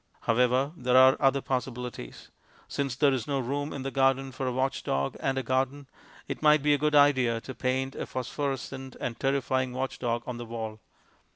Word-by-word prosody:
However, 125 +4 +2
there 125 -3 +2
are 130 +1 +8
other 135 0 +3
possibilities. 125 - -5 0.4
Since 140 -3 -2
there 140 +1 +3
is 125 -4 -2
no 140 -1 0
room 140 +4 -2
in 140 - -5
the 135 - -3
garden 135 0 +2
for 130 0 -4
a - - 0
watchdog 125 - -1
and 135 0 -1
a 135 - -1
garden, 130 +3 -1 0.4
it - - -5
might 150 -1 +5
be 150 0 +4
a 145 - +1
good 150 +1 +1
idea 130 -5 +4
to 130 - -8
paint 130 +1 -1
a - - -5
phosphorescent 135 0 -4
and 120 -2 -4
terrifying 130 -2 0
watchdog 125 -2 -2
on 125 -2 -5
the 120 - -6
wall. 110 -1 -5
130 Hz, 185 wpm, -28 LUFS, 125-135 Hz, 0.4 s, are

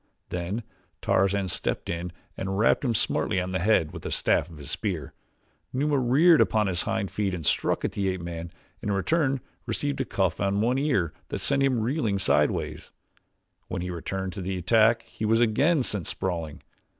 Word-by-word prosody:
Then 90 +6 -3 0.4
Tarzan 100 0 +2
stepped - - -2
in 85 +1 -3 0.2
and 95 0 -3
rapped 110 - +3
him 120 -4 +1
smartly 95 - +1
on 90 0 -3
the 95 - 0
head 85 -5 +3
with - - -7
the - - -5
shaft 75 - +1
of 80 - -12
his 75 +1 -7
spear. 90 -6 -3 0.6
Numa 145 +2 +1
reared 150 +7 +5
upon 110 -1 +3
his 95 -1 0
hind 100 -4 -2
feet 100 -3 -1
and 80 -4 -6
struck - - +1
at - - -1
the 100 -1 -1
ape 95 -1 -3
man 85 0 -6 0.3
and 105 - -3
in - - +2
return 135 - +1 0.3
received 140 +4 -1
a - - -1
cuff 95 -7 0
on 100 0 +1
one 125 +5 +2
ear 125 - +1
that - - -3
sent 140 -1 +1
him 130 -4 +2
reeling 115 -4 0
sideways. 95 - 0 0.8
When 85 - -3
he 90 - -3
returned 95 +2 -4
to 100 - -5
the 95 +1 -2
attack 115 +5 +4
he - - -9
was 110 +1 +3
again 135 +7 +3
sent 105 -7 -3
sprawling. 85 -5 -3
100 Hz, 190 wpm, -26 LUFS, 90-120 Hz, 0.8 s, reared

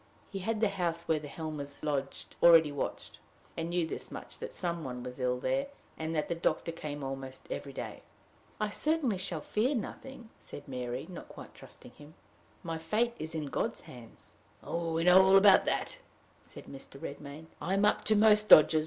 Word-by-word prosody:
He 195 - -4
had 220 +3 -2
the 215 - +4
house 170 -4 -2
where 160 -2 +1
the 150 - -8
Helmers 145 -2 -6
lodged 140 -2 -3
already 165 -3 +7
watched, 145 - -5 0.4
and 165 0 -3
knew 175 -1 +1
this - - -3
much, - - -8
that - - -6
some 170 -2 -2
one 125 -2 -5
was 125 +1 -8
ill 125 -1 0
there, 270 - 0 0.3
and 160 +1 -4
that 150 - 0
the - - -1
doctor 165 0 -1
came 150 -3 -6
almost 135 -1 -6
every 140 - -4
day. - - -7 0.6
"I 215 -1 -1
certainly 295 - 0
shall 180 -4 -3
fear 230 - 0
nothing," 245 0 -7
said 145 - -10
Mary, 125 0 -4
not 180 -2 -9
quite - - -11
trusting - - -14
him; 150 +1 -15 0.5
"my 165 -1 -4
fate 215 +9 0
is 160 +1 -5
in 155 -2 -2
God's 140 - -2
hands." 120 -3 -13 0.3
"We 165 -1 -2
know 180 +2 +8
all 190 +1 +6
about 195 -1 +7
that," - - -2 0.4
said - - -10
Mr. 135 0 -10
Redmain; 145 0 -8 0.2
"I'm 195 +3 +1
up 210 - +2
to 215 - +4
most 210 0 +5
dodges. 155 +1 +9
165 Hz, 185 wpm, -31 LUFS, 145-195 Hz, 0.6 s, dodges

